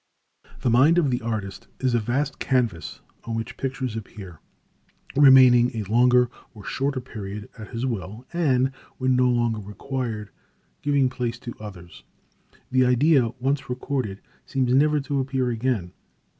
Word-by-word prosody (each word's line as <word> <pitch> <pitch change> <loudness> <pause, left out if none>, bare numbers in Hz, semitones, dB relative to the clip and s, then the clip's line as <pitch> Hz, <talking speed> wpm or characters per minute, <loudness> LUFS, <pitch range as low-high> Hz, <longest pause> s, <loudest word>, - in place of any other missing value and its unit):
The - - +1
mind 140 +8 +5
of 150 -6 +3
the 125 +1 -1
artist 110 -4 -4
is 130 -2 +1
a 120 - +3
vast 135 +6 -2
canvas 120 -10 -1 0.2
on 115 - -3
which 115 0 -4
pictures 130 -3 -3
appear, 100 -6 -9 0.8
remaining 130 -3 +7
a 110 - -1
longer 125 +4 +4 0.3
or 105 - -11
shorter 135 0 -1
period 105 -4 -7
at 110 -1 -9
his 120 +1 -3
will, 110 0 -5
and, 135 -6 +2 0.3
when 130 0 +1
no 125 0 +3
longer 120 -2 +1
required, 105 0 -5 0.5
giving 140 -2 +2
place 125 -2 -3
to 120 - -6
others. 95 -5 -11 0.7
The 130 0 +4
idea 125 +1 +4
once 135 +2 -1
recorded 125 -5 -3 0.2
seems 130 -2 0
never 150 +3 +4
to 140 0 -2
appear 130 -2 -1
again. 115 -6 -2
125 Hz, 145 wpm, -24 LUFS, 110-135 Hz, 0.8 s, remaining